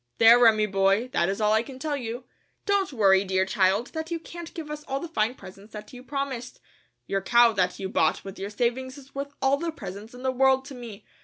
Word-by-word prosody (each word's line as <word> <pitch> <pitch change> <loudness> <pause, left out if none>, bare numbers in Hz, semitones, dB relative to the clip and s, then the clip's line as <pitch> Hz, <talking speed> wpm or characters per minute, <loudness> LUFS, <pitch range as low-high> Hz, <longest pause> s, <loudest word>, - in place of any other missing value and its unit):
There, 230 +2 +8
Remi, 220 -3 +5
boy, 195 +4 +1
that 175 - +1
is 195 - -2
all 210 0 +3
I 220 - +4
can 255 +2 -10
tell 295 +2 -2
you. 240 -2 -5 0.4
Don't 400 -3 +1
worry, 195 -6 +4
dear 190 -1 +1
child, 195 +3 +1
that 320 0 -4
you 335 -1 -2
can't 335 0 -9
give 315 -3 -6
us 300 0 -6
all 270 0 -2
the 340 - -6
fine 230 -5 0
presents 195 +1 -14
that 210 +2 -9
you 250 - -10
promised. 265 -2 -5 0.5
Your 195 0 -1
cow 235 +4 +5
that 180 -3 0
you 190 - -4
bought - - +1
with 195 0 -9
your 195 +1 -4
savings 250 +5 -2
is 275 -1 -15
worth 280 +1 -5
all 270 +1 +3
the 335 +2 -3
presents 215 -4 -9
in 250 - -11
the 260 - +1
world 265 +1 +3
to 275 - -9
me. 235 -5 -10
240 Hz, 235 wpm, -26 LUFS, 205-275 Hz, 0.5 s, There